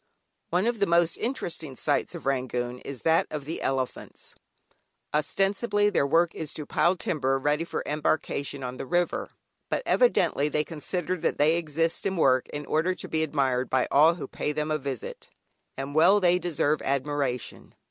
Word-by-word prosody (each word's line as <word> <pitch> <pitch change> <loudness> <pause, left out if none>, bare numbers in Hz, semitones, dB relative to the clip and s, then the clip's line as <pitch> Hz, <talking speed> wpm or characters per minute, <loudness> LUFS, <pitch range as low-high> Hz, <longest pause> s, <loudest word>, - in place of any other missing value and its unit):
One 180 +4 +1
of 235 -1 0
the 200 - +2
most 170 -1 +3
interesting 170 - -3
sights 145 +6 -1
of 170 - -8
Rangoon 125 -2 -1
is 135 -1 -8
that 165 0 +3
of 150 -3 -5
the 160 - -5
elephants. 130 -1 -3 0.8
Ostensibly 205 +7 +1
their 140 -7 +2
work 165 +4 +3
is 155 -2 -5
to 150 - -5
pile 175 +5 +2
timber 135 -6 0
ready 150 +4 0
for 170 - -4
embarkation 145 -2 -1
on 125 0 -5
the 135 - -6
river, 175 +2 0 0.4
but - - -1
evidently 310 - +3
they 150 0 0
consider 175 +4 -3
that - - -1
they 155 +3 +4
exist 165 +2 -1
and 190 -1 -2
work 130 -5 +3
in 145 0 -6
order 165 +6 +1
to - - -7
be 160 - -1
admired 135 -5 0
by 130 -1 +2
all 155 +4 +6
who 170 - -6
pay 150 - -3
them 150 +1 -2
a 155 - 0
visit. 135 -4 -6 0.5
And 135 +1 -5
well 170 +7 +6
they 180 -1 +3
deserve 155 -4 0
admiration! 140 -2 -2
150 Hz, 175 wpm, -27 LUFS, 140-175 Hz, 0.8 s, all